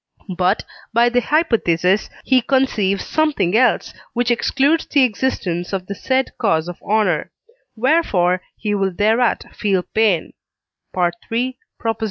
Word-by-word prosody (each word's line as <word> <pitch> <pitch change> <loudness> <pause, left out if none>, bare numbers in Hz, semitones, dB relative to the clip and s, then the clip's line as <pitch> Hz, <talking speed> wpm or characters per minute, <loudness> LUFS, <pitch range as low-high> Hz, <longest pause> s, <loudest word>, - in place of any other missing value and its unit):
But, 185 +4 +1 0.3
by 235 +1 +4
the 245 +1 +1
hypothesis, 215 - +1 0.2
he 260 -1 +4
conceives 230 -7 +1
something 300 - +1
else, 250 +2 +2 0.2
which 245 0 0
excludes 280 +6 +1
the 285 -2 +3
existence 200 -7 -1
of 190 -1 -2
the 200 - -5
said 260 +6 -1
cause 165 -7 +1
of 175 - -8
honour: 215 0 0 0.5
wherefore 215 - +2 0.2
he 210 -1 -2
will 195 -1 0
thereat 220 +6 +1
feel 195 -4 0
pain 210 -6 0 0.6
(III. 225 +9 -1
220 Hz, 125 wpm, -19 LUFS, 185-255 Hz, 0.6 s, by